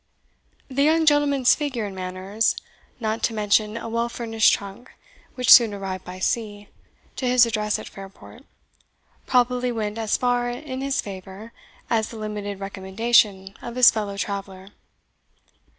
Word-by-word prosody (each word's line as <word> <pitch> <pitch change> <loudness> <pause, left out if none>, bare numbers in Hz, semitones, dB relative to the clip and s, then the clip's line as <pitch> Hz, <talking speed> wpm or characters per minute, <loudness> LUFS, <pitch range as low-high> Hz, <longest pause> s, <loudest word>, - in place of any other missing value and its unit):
The 275 +1 -2
young 320 +2 +3
gentleman's 290 -4 +4
figure 270 -7 -3
and 195 -2 -7
manners; 185 +4 -1 0.4
not 220 -1 -2
to 225 - 0
mention 210 +1 +1
a 230 - -6
well 230 +1 -1
furnished 225 -2 +2
trunk, 200 +5 -5 0.5
which 250 -1 +2
soon 225 -4 +8
arrived 190 -2 -5
by 180 +1 -8
sea, 205 +1 -3 0.5
to 255 - -2
his 250 -1 +5
address 215 -2 -1
at - - -9
Fairport, 195 +5 -13 0.8
probably 250 0 +2
went 215 -1 -3
as 220 -1 0
far 245 -1 0
in 260 +1 -6
his 275 0 -1
favour 195 +3 -10 0.3
as 225 -1 0
the 230 - -9
limited 210 -2 -5
recommendation 195 +1 +1
of 240 0 -7
his 250 -1 +7
fellow 205 -2 -4
traveller. 195 -1 -5
220 Hz, 145 wpm, -23 LUFS, 200-245 Hz, 0.8 s, soon